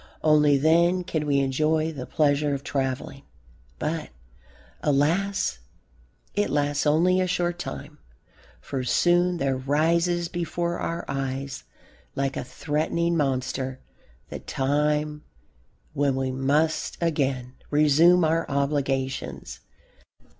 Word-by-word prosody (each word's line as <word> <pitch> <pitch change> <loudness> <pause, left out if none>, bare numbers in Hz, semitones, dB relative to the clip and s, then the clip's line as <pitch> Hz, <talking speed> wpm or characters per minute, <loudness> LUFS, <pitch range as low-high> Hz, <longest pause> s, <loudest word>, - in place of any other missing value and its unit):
Only 150 -2 +5
then 170 +5 +3
can 155 -3 -2
we 140 -1 +2
enjoy 155 +4 +1
the 135 -5 -7
pleasure 145 -1 +1
of 140 - -7
travelling, 135 0 -3 0.6
but, 160 +1 -3 0.7
alas, 150 - +1 0.7
it 205 +1 0
lasts 145 0 0
only 180 +5 +3
a 185 - +1
short 175 -1 -1
time. 70 - -7 0.6
For 130 -2 -4
soon 175 +7 +2
there 135 -3 0
rises 165 +6 +1
before 170 0 -3
our 170 0 -3
eyes, 135 -1 -4 0.5
like 135 0 -1
a - - -3
threatening 160 +5 -1
monster, 130 -2 -1 0.5
the - - -6
time 150 +2 -1 0.7
when 140 -1 +1
we 135 0 -1
must 145 +5 0
again 135 -6 -1 0.2
resume 155 +4 +5
our 165 0 0
obligations. 135 - -2
150 Hz, 110 wpm, -25 LUFS, 135-165 Hz, 0.7 s, Only